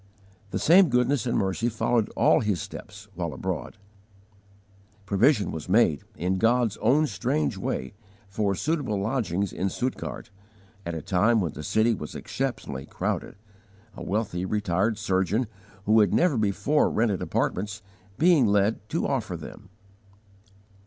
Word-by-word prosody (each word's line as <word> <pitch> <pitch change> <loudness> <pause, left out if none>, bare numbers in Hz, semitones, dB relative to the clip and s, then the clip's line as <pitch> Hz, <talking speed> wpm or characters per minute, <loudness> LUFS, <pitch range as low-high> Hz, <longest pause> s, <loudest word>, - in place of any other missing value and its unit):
The - - -3
same 180 +1 +6
goodness 125 0 +1
and 120 - +1
mercy 95 +5 0
followed 115 0 0
all - - +5
his 105 -5 0
steps 105 +6 -9
while 85 -3 -4
abroad. - - -4 1.3
Provision 105 - +3
was 80 +2 -7
made, 90 -8 +3
in 95 +3 -1
God's 115 -1 +2
own 135 +8 +3
strange 75 - -1
way, 65 - -3 0.3
for 100 0 -1
suitable 145 - -1
lodgings 100 -4 -1
in 95 - -1
Stuttgart, 125 -1 -4 0.6
at 85 - -3
a 80 - -5
time 110 +5 +3
when 85 -6 -1
the - - -7
city 110 +9 +2
was 75 -8 -7
exceptionally 95 - -4
crowded, - - -3 0.6
a - - -9
wealthy 100 -3 -2
retired 100 +1 0
surgeon, 105 +2 0 0.4
who 110 +2 +5
had 105 -4 +3
never 175 -5 +3
before 110 +8 +2
rented 110 -4 0
apartments, 100 +2 -2 0.3
being 160 -7 +5
led 100 +1 +2
to 165 - -1
offer 110 -10 -2
them. 95 +5 -11
105 Hz, 140 wpm, -26 LUFS, 95-120 Hz, 1.3 s, same